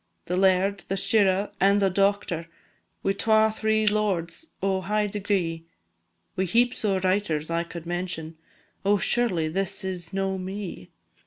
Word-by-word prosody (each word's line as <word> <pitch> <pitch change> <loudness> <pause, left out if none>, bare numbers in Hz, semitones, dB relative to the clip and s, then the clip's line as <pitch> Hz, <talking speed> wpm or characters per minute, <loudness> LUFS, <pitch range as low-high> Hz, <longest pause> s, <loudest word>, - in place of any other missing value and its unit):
The 180 - -2
Laird, 190 +1 +3
the 195 - -1
Shirra, 200 -1 +2
and 200 +1 +5
the 195 -1 +2
Doctor, 195 -4 0 0.6
Wi' 195 - +2
twa 220 +2 +3
three 220 0 +1
Lords 210 - 0 0.2
o' 190 -1 +1
high 210 +3 0
degree; 190 -5 -2 0.7
Wi' 190 -1 0
heaps 240 +7 +2
o' 200 -3 +2
Writers 185 -5 0
I 170 0 +1
could 170 -1 -9
mention 175 -2 -3 0.5
Oh, 205 +1 +3
surely 190 -8 +1
this 190 +4 -2
is 180 -3 -4
no 195 0 -1
me! 185 - -6
195 Hz, 145 wpm, -26 LUFS, 175-205 Hz, 0.7 s, and